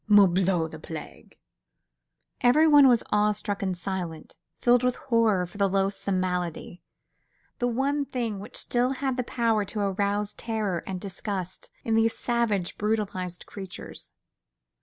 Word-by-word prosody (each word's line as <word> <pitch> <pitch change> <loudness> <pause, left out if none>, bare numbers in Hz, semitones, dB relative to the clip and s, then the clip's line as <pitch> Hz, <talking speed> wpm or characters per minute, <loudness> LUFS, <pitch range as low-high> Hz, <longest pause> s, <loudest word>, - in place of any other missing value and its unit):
"Morbleu! 190 -4 +5
the 155 -1 -10
plague!" 160 0 -9 1.0
Everyone 290 +3 +6
was 240 -3 +4
awe 210 0 +3
struck 205 -1 -3
and 190 -2 -1
silent, 175 -3 -5 0.2
filled 245 0 +4
with 250 0 +1
horror 225 -7 +2
for 190 +4 -12
the 200 -1 +3
loathsome 195 0 0
malady, 180 -1 -3 0.8
the 245 - +1
one 275 +4 0
thing 230 -6 -3
which 205 - -8
still 250 +2 +1
had 265 -1 -1
the 250 - -1
power 230 -3 +1
to 210 - -5
arouse 200 +1 0
terror 215 -6 -2
and 185 -1 -3
disgust 190 -1 -5
in 225 - -1
these 225 0 +2
savage, 230 -7 0
brutalised 195 -5 -2
creatures. 190 -3 -9
205 Hz, 140 wpm, -27 LUFS, 185-235 Hz, 1.0 s, Everyone